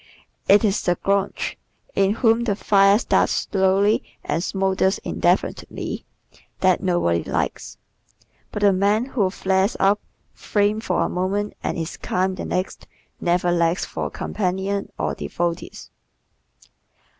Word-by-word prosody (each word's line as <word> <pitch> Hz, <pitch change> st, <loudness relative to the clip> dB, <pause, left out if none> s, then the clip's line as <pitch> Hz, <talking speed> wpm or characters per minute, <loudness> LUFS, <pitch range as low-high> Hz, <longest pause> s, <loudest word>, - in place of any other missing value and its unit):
It 205 Hz, +3 st, +6 dB
is 205 Hz, -1 st, +1 dB
the 175 Hz, -, +1 dB
grouch 200 Hz, +1 st, -1 dB, 0.3 s
in 195 Hz, +1 st, +2 dB
whom 230 Hz, 0 st, +3 dB
the 205 Hz, -4 st, +1 dB
fire 200 Hz, 0 st, +4 dB
starts 245 Hz, -, +2 dB
slowly 195 Hz, +2 st, +3 dB, 0.2 s
and 165 Hz, +3 st, -1 dB
smoulders 190 Hz, 0 st, +1 dB
indefinitely -, -, -1 dB, 0.6 s
that 185 Hz, -2 st, +3 dB
nobody 175 Hz, -, +1 dB
likes. -, -, -3 dB, 0.7 s
But 210 Hz, -, -3 dB
the 200 Hz, -1 st, +6 dB
man 205 Hz, +5 st, +2 dB
who 225 Hz, -8 st, 0 dB
flares 190 Hz, +2 st, 0 dB
up, 200 Hz, +2 st, +3 dB, 0.3 s
flames 210 Hz, +1 st, 0 dB
for 180 Hz, -, +1 dB
a -, -, 0 dB
moment 195 Hz, +3 st, -1 dB
and -, -, -2 dB
is 165 Hz, 0 st, -4 dB
calm 185 Hz, +1 st, -1 dB
the 185 Hz, -, -5 dB
next 185 Hz, +1 st, -3 dB, 0.3 s
never 175 Hz, 0 st, +1 dB
lacks 170 Hz, +1 st, +1 dB
for -, -, -4 dB
companions 195 Hz, +1 st, -2 dB
or 75 Hz, -4 st, -1 dB
devotees. 165 Hz, -, -4 dB
190 Hz, 130 wpm, -22 LUFS, 180-205 Hz, 0.7 s, It